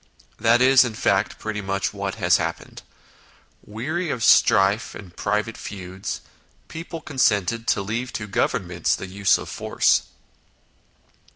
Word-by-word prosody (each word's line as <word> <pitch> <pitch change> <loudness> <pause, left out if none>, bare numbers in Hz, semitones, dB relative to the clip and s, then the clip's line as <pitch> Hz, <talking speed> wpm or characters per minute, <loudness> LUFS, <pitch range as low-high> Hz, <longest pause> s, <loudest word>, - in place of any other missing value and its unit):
That 115 +2 +4
is, 135 0 +7
in 120 -3 -4
fact, 100 -1 +1
pretty 105 -1 -4
much 95 +2 -2
what 100 -1 -4
has 90 -4 +3
happened: 85 0 -5 0.8
weary 155 - -4
of 120 -6 -2
strife 100 +3 +4
and 90 -4 -11
private 105 +2 -2
feuds, 95 -1 -6 0.5
people 165 0 -7
consented 115 - 0
to 100 - +1
leave 115 +5 -3
to 105 - -4
Governments 90 -3 0
the - - -7
use 95 +1 +2
of - - -8
force. - - +1
105 Hz, 130 wpm, -23 LUFS, 95-115 Hz, 0.8 s, is